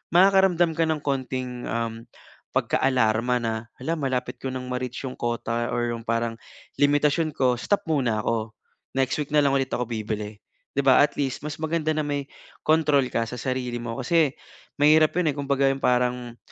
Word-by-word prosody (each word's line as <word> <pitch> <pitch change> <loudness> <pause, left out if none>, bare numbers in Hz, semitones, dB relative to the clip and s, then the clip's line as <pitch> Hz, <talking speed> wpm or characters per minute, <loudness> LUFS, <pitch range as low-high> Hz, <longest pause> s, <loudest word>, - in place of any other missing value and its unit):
makakaramdam 190 -2 +5
ka 165 - +3
ng 155 -2 -1
konting 130 -2 -3 0.9
pagkaalarma 125 -2 +2
na 115 -1 -1 0.5
malapit 130 -2 -2
ko - - -9
ng 130 -1 -5
ma-reach 125 -1 -4
'yung 130 - -7
quota 120 0 -2
or 120 0 0
'yung 115 -1 -7
parang 115 0 -1 0.4
limitasyon 145 +2 +3
ko. 125 -2 +2
Stop 205 - 0
muna 125 -8 +1
ako 110 -2 -1 0.4
next 135 -2 +1
week 145 - -6
na 150 - +5
lang 140 - +3
ulit 135 -1 -1
ako 125 - 0
bibili. 110 -2 -4 0.4
'di 140 - +1
ba, 130 -1 +7
at 145 - +3
least 135 -3 -2
mas 150 0 -5
maganda 155 0 0
na - - +2
may 145 -1 -2 0.4
control 150 -3 +3
ka 115 - +1
sa 125 - -6
sarili 130 -2 -2
mo. 115 -1 -5
Kasi 155 +1 +2 0.5
mahirap 155 +1 +5
'yung 160 -5 +2
kumbaga 140 0 +2 0.2
parang 125 -1 0
130 Hz, 165 wpm, -25 LUFS, 120-150 Hz, 0.9 s, ba